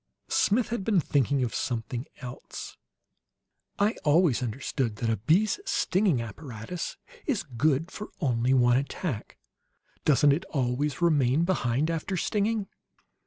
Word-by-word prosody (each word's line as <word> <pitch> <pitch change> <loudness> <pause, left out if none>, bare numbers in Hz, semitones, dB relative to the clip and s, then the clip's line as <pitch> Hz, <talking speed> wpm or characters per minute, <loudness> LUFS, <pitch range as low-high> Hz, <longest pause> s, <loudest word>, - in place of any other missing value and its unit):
Smith 230 +4 +2
had 235 -4 -2
been 205 -2 +3
thinking 140 -3 +1
of 120 - -2
something 120 +1 -3
else. 125 -1 -8 1.0
"I 205 +2 +3
always 150 -4 +4
understood 125 0 -2
that 115 +2 -1
a 110 - 0
bee's 170 - +2
stinging 185 - +1
apparatus 120 - -6 0.3
is 255 - 0
good 145 +4 0
for 210 - -7
only 125 -4 +1
one 120 -1 +5
attack. 140 - -4 0.7
Doesn't 145 -1 +5
it 165 +6 -1
always 135 +2 -1
remain 150 -2 +3
behind 155 -4 +1
after 165 +4 -2
stinging?" 210 +2 0
145 Hz, 125 wpm, -28 LUFS, 125-180 Hz, 1.0 s, one